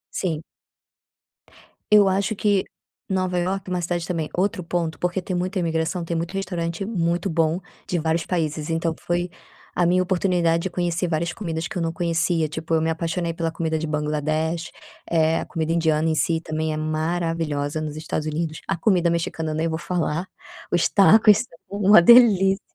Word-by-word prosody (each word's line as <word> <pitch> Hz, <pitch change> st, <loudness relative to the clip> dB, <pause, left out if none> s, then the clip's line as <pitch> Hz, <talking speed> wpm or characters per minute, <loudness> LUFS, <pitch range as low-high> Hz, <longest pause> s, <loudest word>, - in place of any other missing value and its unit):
Sim. 165 Hz, -5 st, -2 dB, 1.5 s
Eu 205 Hz, -2 st, +7 dB
acho 195 Hz, +2 st, 0 dB
que 205 Hz, -2 st, +2 dB, 0.5 s
Nova 185 Hz, -1 st, 0 dB
Iorque 185 Hz, +2 st, -2 dB
é -, -, -2 dB
uma 180 Hz, -, -1 dB
cidade 175 Hz, 0 st, -2 dB
também 165 Hz, -4 st, -2 dB
outro 185 Hz, 0 st, -1 dB
ponto 165 Hz, -2 st, -2 dB
porque 180 Hz, +3 st, -1 dB
tem 180 Hz, 0 st, -4 dB
muita 185 Hz, +2 st, -1 dB
imigração, 165 Hz, +1 st, -1 dB
tem 170 Hz, -, -3 dB
muito 165 Hz, +1 st, -2 dB
restaurante 175 Hz, -2 st, -3 dB
muito 175 Hz, -3 st, -1 dB
bom, 165 Hz, 0 st, +1 dB, 0.3 s
de 175 Hz, -, -1 dB
vários 160 Hz, +1 st, 0 dB
países, 155 Hz, -3 st, -2 dB
então 165 Hz, 0 st, 0 dB
p -, -, -20 dB
foi 175 Hz, +1 st, 0 dB, 0.5 s
a 175 Hz, -, +2 dB
minha 180 Hz, +2 st, +3 dB
oportunidade 175 Hz, -3 st, +1 dB
de 190 Hz, -, -2 dB
conhecer 175 Hz, 0 st, -1 dB
várias 165 Hz, +1 st, -1 dB
comidas 165 Hz, -5 st, -4 dB
que 220 Hz, -, -6 dB
eu -, -, -1 dB
não 165 Hz, 0 st, -1 dB
conhecia, 170 Hz, -1 st, 0 dB
tipo, 160 Hz, +2 st, -5 dB
eu 160 Hz, -, +3 dB
me 160 Hz, -, 0 dB
apaixonei 165 Hz, +1 st, -2 dB
pela 165 Hz, 0 st, -2 dB
comida 160 Hz, -1 st, -2 dB
de 160 Hz, -, -3 dB
Bangladesh 155 Hz, +2 st, -1 dB, 0.4 s
eh, 160 Hz, -1 st, +2 dB
a -, -, -5 dB
comida 165 Hz, -1 st, -2 dB
indiana 160 Hz, -1 st, +2 dB
em 160 Hz, -, +1 dB
si 160 Hz, +2 st, +1 dB
também 155 Hz, 0 st, -3 dB
é 155 Hz, -, -3 dB
maravilhosa 155 Hz, -1 st, -2 dB
nos 155 Hz, -1 st, -5 dB
Estados 155 Hz, 0 st, -3 dB
Unidos, 155 Hz, +1 st, -3 dB
a -, -, 0 dB
comida 175 Hz, -1 st, +2 dB
mexicana 165 Hz, -2 st, -2 dB
nem 160 Hz, +2 st, 0 dB
vou 160 Hz, -1 st, -2 dB
falar, 170 Hz, 0 st, -2 dB, 0.4 s
os 175 Hz, -1 st, +3 dB
tacos 210 Hz, +1 st, +6 dB
são 165 Hz, -9 st, -7 dB, 0.2 s
uma 205 Hz, -2 st, +7 dB
delícia 195 Hz, -3 st, +6 dB
170 Hz, 180 wpm, -23 LUFS, 160-180 Hz, 1.5 s, Eu